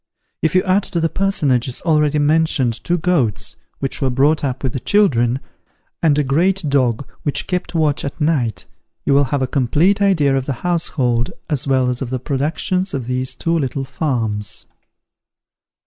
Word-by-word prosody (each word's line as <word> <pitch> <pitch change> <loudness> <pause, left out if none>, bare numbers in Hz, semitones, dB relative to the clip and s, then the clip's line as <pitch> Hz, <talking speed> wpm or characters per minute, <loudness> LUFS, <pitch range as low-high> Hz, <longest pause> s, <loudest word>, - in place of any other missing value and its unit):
If 160 +2 +1
you 185 - +4
add 190 0 +2
to 170 - +1
the 165 0 +1
personages 140 - 0
already 150 -3 +2
mentioned 150 -5 +2
two 175 - +1
goats, 155 - 0 0.2
which 135 - -3
were 135 - +2
brought 145 +5 +2
up 130 -1 -2
with 130 - -1
the 130 - -2
children, 130 - +2 0.6
and 150 -3 +3
a 150 - +3
great 170 +6 +1
dog, 130 -3 +1
which 145 -1 -2
kept 180 -1 -3
watch 155 -3 +1
at 140 - -5
night, 130 - 0 0.4
you 140 - +3
will 140 0 +4
have 135 +1 -1
a 130 - -4
complete 155 - +2
idea 160 -9 +3
of 135 -1 -2
the 140 - 0
household, 130 -9 0 0.2
as 145 -2 -1
well 130 -2 +2
as 125 -1 -1
of 130 - -3
the 130 - -1
productions 155 +7 -1
of 130 -4 -3
these 125 +1 -2
two 165 0 -1
little 135 -3 -1
farms. 115 -8 -2
140 Hz, 175 wpm, -19 LUFS, 130-165 Hz, 0.6 s, you